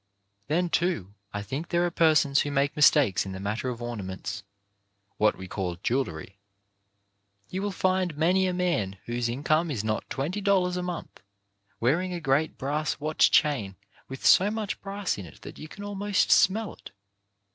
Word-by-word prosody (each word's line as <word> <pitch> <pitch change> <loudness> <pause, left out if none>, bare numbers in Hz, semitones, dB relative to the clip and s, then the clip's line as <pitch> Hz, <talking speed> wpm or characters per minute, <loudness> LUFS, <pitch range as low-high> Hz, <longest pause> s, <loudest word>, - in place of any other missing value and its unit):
Then, 175 +4 +1
too, 165 - 0 0.2
I 105 0 -4
think 140 +10 -5
there 175 0 +2
are 175 - -1
persons 155 -4 +4
who 145 - -2
make 140 0 0
mistakes 145 -8 +4
in 95 - -6
the 95 - -6
matter 105 +6 -2
of 120 -1 -5
ornaments 100 -3 -5 0.4
— 100 0 -47
what 105 0 +3
we 95 0 -8
call 90 -2 -3
jewellery. 100 -7 -2 1.1
You 190 - -3
will 205 0 -1
find 185 -4 0
many 185 +4 +3
a - - 0
man 170 - -1
whose, 120 0 -2
income 155 +6 +1
is 115 -8 -2
not 110 0 -2
twenty 170 +10 -3
dollars 190 -3 +2
a 180 - -2
month 180 -1 -6 0.6
wearing 170 +10 +1
a 175 - -3
great 150 +1 +1
brass 150 +3 -2
watch 155 +1 +3
chain 125 -11 +2 0.3
with 135 0 -8
so 195 +3 +6
much 215 -1 -4
brass 200 - -3
in 95 - -7
it 75 - -16
that - - -10
you 155 - -8
can 200 +6 -10
almost 205 0 0
smell 210 +3 +4
it. - - -13
150 Hz, 180 wpm, -27 LUFS, 110-180 Hz, 1.1 s, so